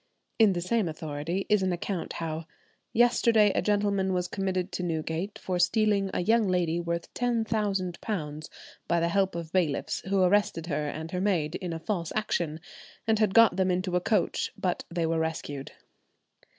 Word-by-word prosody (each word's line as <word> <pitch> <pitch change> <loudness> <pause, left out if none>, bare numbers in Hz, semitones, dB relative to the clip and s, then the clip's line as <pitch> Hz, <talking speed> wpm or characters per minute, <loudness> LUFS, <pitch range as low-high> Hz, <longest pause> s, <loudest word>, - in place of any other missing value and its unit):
In 215 -3 +6
the 175 - -2
same 210 +2 +1
authority 155 +4 -3
is 210 -2 +3
an 190 -1 +1
account 175 0 -3
how—"Yesterday 210 +7 +1
a - - +1
gentleman 200 -2 +1
was 180 -1 0
committed 190 -1 -2
to - - -3
Newgate 165 +3 -3
for 180 -1 -3
stealing 205 -1 +2
a - - -1
young 225 +1 +3
lady 175 -2 +1
worth 170 0 -3
£10,000, 200 -9 -2 0.4
by 170 - +2
the 170 0 +1
help 195 0 +1
of 165 -2 -5
bailiffs, 170 -6 0
who 195 -1 +3
arrested 185 -3 +2
her 150 -2 -2
and 160 +2 -5
her 180 - -2
maid 175 -6 +1
in 180 -2 -4
a 165 - -3
false 170 -1 -3
action, 170 -7 -1 0.5
and 220 -1 +2
had 215 -3 +2
got 230 -3 +6
them 190 -1 +2
into 180 0 0
a 180 - +2
coach, 215 +3 0
but 180 -2 -2
they 170 -1 -1
were 165 0 0
rescued." 155 -4 -4
180 Hz, 170 wpm, -28 LUFS, 165-205 Hz, 0.5 s, In